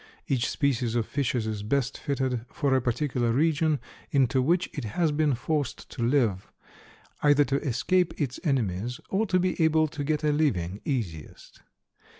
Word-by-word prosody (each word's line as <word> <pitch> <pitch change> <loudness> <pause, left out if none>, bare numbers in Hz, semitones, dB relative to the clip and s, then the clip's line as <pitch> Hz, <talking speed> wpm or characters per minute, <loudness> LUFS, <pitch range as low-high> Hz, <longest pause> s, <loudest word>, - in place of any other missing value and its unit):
Each 125 -3 +1
species 125 -5 0
of 115 -2 +1
fishes 125 -4 -1
is 110 -2 -3
best 125 +5 0
fitted 130 -4 -2
for 140 -3 0
a 130 - +3
particular 125 -1 0
region 155 +2 +2 0.3
into 135 -1 +2
which 170 +7 +2
it 145 - -4
has 155 +9 0
been 145 -2 +2
forced 145 +2 -3
to - - -6
live, 115 -6 +1 0.7
either 145 0 +5
to 140 +3 0
escape 160 +7 0
its 135 -5 -2
enemies 120 - -1
or 215 +3 +1
to 185 -1 +2
be 180 -2 +1
able 160 0 +4
to 145 0 -5
get 150 +1 -1
a 150 - +3
living 105 - 0
easiest. 95 - -5
135 Hz, 160 wpm, -27 LUFS, 120-150 Hz, 0.7 s, either